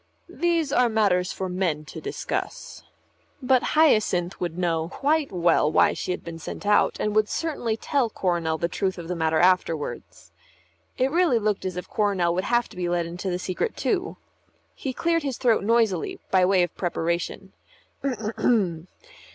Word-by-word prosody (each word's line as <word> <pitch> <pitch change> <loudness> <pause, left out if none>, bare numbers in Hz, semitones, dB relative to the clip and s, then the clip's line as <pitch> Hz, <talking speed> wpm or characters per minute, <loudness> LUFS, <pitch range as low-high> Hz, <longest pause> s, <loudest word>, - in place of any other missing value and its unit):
"These 335 -4 0
are 250 -3 +4
matters 195 -5 +2
for 190 - -4
men 180 -5 -1
to - - -9
discuss." 415 - -5 0.6
But 255 -1 +3 0.2
Hyacinth 210 - +3
would 175 -1 -3
know 165 -2 0
quite 295 +6 0
well 170 -4 +2
why - - +4
she - - -5
had 180 - -2
been 165 -1 -8
sent 180 - -7
out, 210 0 +3
and 210 0 -1
would 215 0 +3
certainly 260 -9 -2
tell 265 -1 0
Coronel 170 -5 -1
the 170 - 0
truth 190 +1 -2
of 170 -2 -7
the 180 - -2
matter 160 -1 +1
afterwards. 175 -3 0 0.7
It 260 +1 +1
really 335 -6 +3
looked 210 -3 -1
as 185 -1 -3
if 180 - -5
Coronel 195 -5 +1
would 185 +2 -1
have 240 +1 +1
to - - -14
be 180 -1 -2
let 175 -1 0
into 175 +3 -5
the 180 - -1
secret 185 - -3
too. 390 -1 -1 0.6
He 270 - -4
cleared 335 +5 0
his 275 -4 -3
throat 230 -5 +2
noisily 220 -5 +1
by 185 -1 +5
way 185 -1 +4
of 175 - -3
preparation. 170 +2 -3
190 Hz, 170 wpm, -25 LUFS, 175-240 Hz, 0.7 s, by